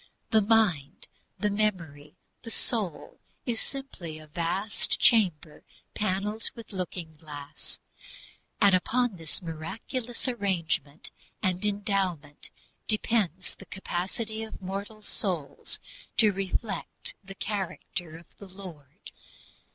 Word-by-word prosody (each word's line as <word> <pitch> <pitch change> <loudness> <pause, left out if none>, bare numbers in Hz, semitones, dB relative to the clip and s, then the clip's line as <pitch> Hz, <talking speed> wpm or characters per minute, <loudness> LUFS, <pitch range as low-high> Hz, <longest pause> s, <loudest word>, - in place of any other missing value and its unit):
The 220 -2 +7
mind, 200 -10 +3 0.3
the 210 -1 +2
memory, 165 -9 0 0.3
the 230 - -7
soul, 205 -9 -1 0.3
is 235 -3 +2
simply 230 - -4
a 155 - -10
vast 175 +7 0
chamber 175 -10 +5 0.3
panelled 210 +2 0
with 230 -2 -9
looking 180 -3 -3
glass. 150 -2 -8 0.8
And 200 -2 +7
upon 230 +3 +3
this 165 +2 -2
miraculous 225 - -2
arrangement 175 - 0 0.3
and 185 -1 +2
endowment 195 -8 0 0.4
depends 215 -5 +2
the - - -13
capacity 195 +4 -2
of 220 -1 -6
mortal 200 +3 -4
souls 160 -11 -2 0.4
to 215 -3 +9
"reflect 195 +2 -2
the 195 0 -8
character 185 -5 -3
of 170 - -13
the 200 - -9
Lord." 180 -5 -10
190 Hz, 105 wpm, -29 LUFS, 165-215 Hz, 0.8 s, to